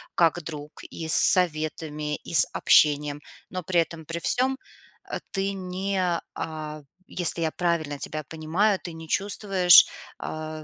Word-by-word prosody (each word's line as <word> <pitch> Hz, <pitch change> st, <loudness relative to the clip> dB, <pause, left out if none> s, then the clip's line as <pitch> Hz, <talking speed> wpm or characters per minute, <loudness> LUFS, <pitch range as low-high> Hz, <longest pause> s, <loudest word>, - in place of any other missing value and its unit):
как 170 Hz, -1 st, +2 dB
друг: 150 Hz, -2 st, -8 dB, 0.2 s
и 160 Hz, -, -7 dB
с 160 Hz, -, +3 dB
советами, 155 Hz, -3 st, +2 dB
и -, -, -11 dB
с -, -, +8 dB
общением. 145 Hz, -1 st, +3 dB, 0.3 s
Но 185 Hz, -1 st, -6 dB
при 175 Hz, +1 st, +1 dB
этом 165 Hz, -1 st, -3 dB
при 165 Hz, +2 st, -5 dB
всём, 260 Hz, +8 st, 0 dB, 0.5 s
э, -, -, -4 dB
ты 195 Hz, 0 st, -2 dB
не, 190 Hz, +1 st, -3 dB, 0.3 s
а- 155 Hz, -1 st, -6 dB, 0.3 s
если 175 Hz, -1 st, +1 dB
я 160 Hz, -1 st, 0 dB
правильно 160 Hz, -5 st, -2 dB
тебя 155 Hz, 0 st, -5 dB
понимаю- 165 Hz, +7 st, -1 dB
ты 175 Hz, -, -6 dB
не 160 Hz, 0 st, -10 dB
чувствуешь, 195 Hz, -1 st, +5 dB, 0.3 s
а, 155 Hz, 0 st, -7 dB
165 Hz, 145 wpm, -25 LUFS, 155-185 Hz, 0.5 s, с